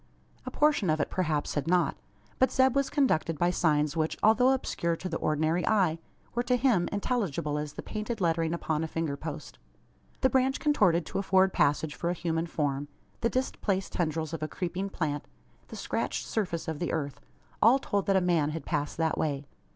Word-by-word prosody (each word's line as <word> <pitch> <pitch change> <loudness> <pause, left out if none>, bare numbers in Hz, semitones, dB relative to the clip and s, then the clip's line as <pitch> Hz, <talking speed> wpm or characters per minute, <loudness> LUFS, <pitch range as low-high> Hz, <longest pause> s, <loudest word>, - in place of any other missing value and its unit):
A - - 0
portion 295 - +2
of 155 0 +2
it 145 - -1
perhaps 155 -5 -1
had 145 +1 -2
not. 175 -3 +2 0.4
But 260 - +5
Zeb 260 0 +3
was 275 0 +2
conducted 165 - +1
by 175 +3 +2
signs 150 -3 +1
which, 160 -1 -1
although 225 +4 +5
obscure 170 -10 -1
to 185 - -6
the 165 -2 -3
ordinary 155 +3 +1
eye, 185 -7 +2 0.3
were 240 - +1
to 250 +1 +1
him 235 -9 +2
intelligible 195 - -1
as 150 -1 -5
the - - -7
painted 215 +1 -4
lettering 165 -2 +1
upon 160 -2 -1
a - - -2
finger 160 -3 -2
post. 155 +1 -7 0.6
The 260 - +4
branch 265 +1 +2
contorted 185 - +3
to - - -3
afford 190 -1 +3
passage 150 +1 +2
for 170 - -2
a - - +1
human 165 -1 -2
form 145 -3 -2 0.3
the 230 - +1
displaced 205 -7 -1
tendrils 160 -2 -1
of 165 - -4
a 155 - -1
creeping 185 +3 -3
plant 150 -6 -3 0.4
the - - -9
scratched - - -2
surface 180 -7 -2
of 160 -2 -3
the 175 - -1
earth 145 -4 -3 0.4
all 235 +5 +7
told 205 -7 -2
that 195 - +3
a 190 - +4
man 170 -5 +2
had 160 +1 -5
passed 145 0 -2
that 160 -1 0
way. 145 -2 -1
170 Hz, 195 wpm, -29 LUFS, 155-205 Hz, 0.6 s, all